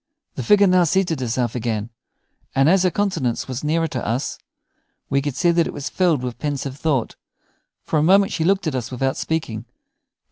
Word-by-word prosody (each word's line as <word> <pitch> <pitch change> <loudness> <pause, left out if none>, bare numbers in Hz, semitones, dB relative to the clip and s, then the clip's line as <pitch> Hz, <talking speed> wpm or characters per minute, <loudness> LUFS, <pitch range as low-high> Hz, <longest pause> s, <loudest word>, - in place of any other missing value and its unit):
The - - -5
figure 205 -1 +5
now 185 -1 +4
seated 170 -2 +1
herself 120 -1 -1
again, 115 -2 -3 0.6
and 135 +1 +4
as 185 +3 +5
her 185 - +3
countenance 170 - -1
was 130 +1 -5
nearer 165 +2 +1
to 130 - -4
us, 125 +5 -2 0.7
we 140 0 +2
could 145 -2 -3
see 175 +5 +3
that 170 -1 +2
it - - -6
was 145 - -5
filled 170 -8 +1
with 125 -1 -5
pensive 140 -2 -3
thought. 140 -7 0 0.7
For 155 - 0
a - - +2
moment 195 +5 +4
she 160 - -1
looked 195 +3 +2
at 155 - -1
us 125 -3 -3
without 135 +1 -1
speaking. 120 -9 -3
145 Hz, 190 wpm, -21 LUFS, 125-175 Hz, 0.7 s, figure